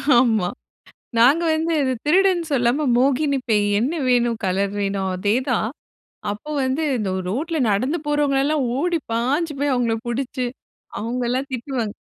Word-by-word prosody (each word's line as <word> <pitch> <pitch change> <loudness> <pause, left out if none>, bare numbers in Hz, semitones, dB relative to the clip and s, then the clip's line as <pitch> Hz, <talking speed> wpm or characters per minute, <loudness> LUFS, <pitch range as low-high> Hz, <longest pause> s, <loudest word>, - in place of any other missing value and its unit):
ஆமா. 225 -7 +3 0.7
நாங்க 275 +9 +5
வந்து 325 +1 0
இது 260 -1 +1
திருடன்னு 360 0 +3
சொல்லாம, 265 +3 +2
மோகினி 275 +2 +2
பேய் 210 -2 +3
"என்ன 265 +7 0 0.2
வேணும்? 240 -2 +2
கலர் 195 +2 0
வேணும்." 195 -1 -1
அதே 205 +3 +1 0.2
தான். 220 -2 +1 0.6
அப்போ 215 +9 -8
வந்து 260 +4 0 0.2
இந்த 200 -4 -2 0.2
ரோட்ல 315 - -2
நடந்து 255 +11 +1
போறவுங்கள 290 -2 +2
எலலாம் 295 -2 +1
ஓடி 345 +3 +1 0.2
பாஞ்சு 285 +7 0
போய் 285 -2 +1
அவுங்கள 235 -2 +1
புடிச்சி, 250 0 -2 0.5
அவுங்கலாம் 250 +4 -2
திட்டுவாங்க. 240 -4 -3
255 Hz, 140 wpm, -22 LUFS, 225-295 Hz, 0.7 s, நாங்க